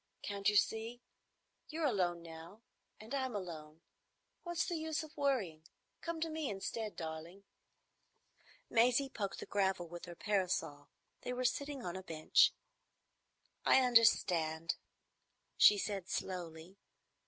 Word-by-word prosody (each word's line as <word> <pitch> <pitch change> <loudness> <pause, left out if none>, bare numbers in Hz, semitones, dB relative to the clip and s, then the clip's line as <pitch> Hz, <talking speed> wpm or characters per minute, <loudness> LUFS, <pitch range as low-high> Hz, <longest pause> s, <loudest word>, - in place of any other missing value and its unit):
Can't 200 -1 +1
you 210 - 0
see? 225 +3 +1 0.7
You're 320 0 -1
alone 180 -9 +1
now 165 +6 -11 0.4
and 220 +5 -9
I'm 260 -4 -1
alone. 160 -5 -6 0.6
What's 345 -1 -1
the 345 - -2
use 315 0 -2
of 310 0 -12
worrying? 235 - 0 0.4
Come 335 -1 -3
to 330 - 0
me 310 -3 -2
instead, 210 +2 -4
darling." 165 +4 -7 1.2
Maisie 250 +4 +3
poked 200 -6 -4
the - - -5
gravel 190 -3 0
with 175 +1 -8
her 175 -1 -9
parasol. 175 -8 -1 0.3
They 250 - -3
were 250 0 -2
sitting 280 +1 -1
on 175 0 -3
a 190 - -4
bench. 160 -4 +4 1.1
"I 265 - +6
understand," 175 -9 +4 0.8
she 210 - +8
said 195 -2 -3
slowly. 175 0 -4
200 Hz, 130 wpm, -35 LUFS, 170-250 Hz, 1.2 s, she